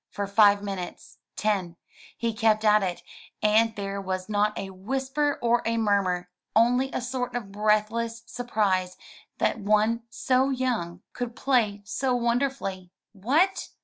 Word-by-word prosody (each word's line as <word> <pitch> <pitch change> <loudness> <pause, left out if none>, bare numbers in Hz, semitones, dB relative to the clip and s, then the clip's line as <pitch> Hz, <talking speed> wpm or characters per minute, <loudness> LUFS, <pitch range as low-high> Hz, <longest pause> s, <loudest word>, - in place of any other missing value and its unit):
For 200 - -3
five 200 0 +5
minutes, 195 -3 -7 0.2
ten, 195 -5 -1 0.4
he 230 -1 -1
kept 220 -1 +2
at 210 0 +5
it, 180 -2 -3 0.4
and 220 +1 +3
there 200 -1 -4
was 185 -1 -3
not 210 0 +1
a 195 - -5
whisper 265 +9 -1
or 235 0 +3
a 230 0 0
murmur, 190 -5 +1 0.2
only 250 +4 +3
a - - -2
sort 250 0 -3
of 215 -5 -4
breathless 215 +2 0
surprise 200 -7 -1 0.4
that - - 0
one 215 +3 +2
so 255 +3 +1
young 235 -10 -2
could 245 -1 -5
play 225 -7 +1
so 255 +4 -1
wonderfully. 235 -6 -1 0.2
"What! 285 - +1
215 Hz, 140 wpm, -26 LUFS, 200-245 Hz, 0.4 s, five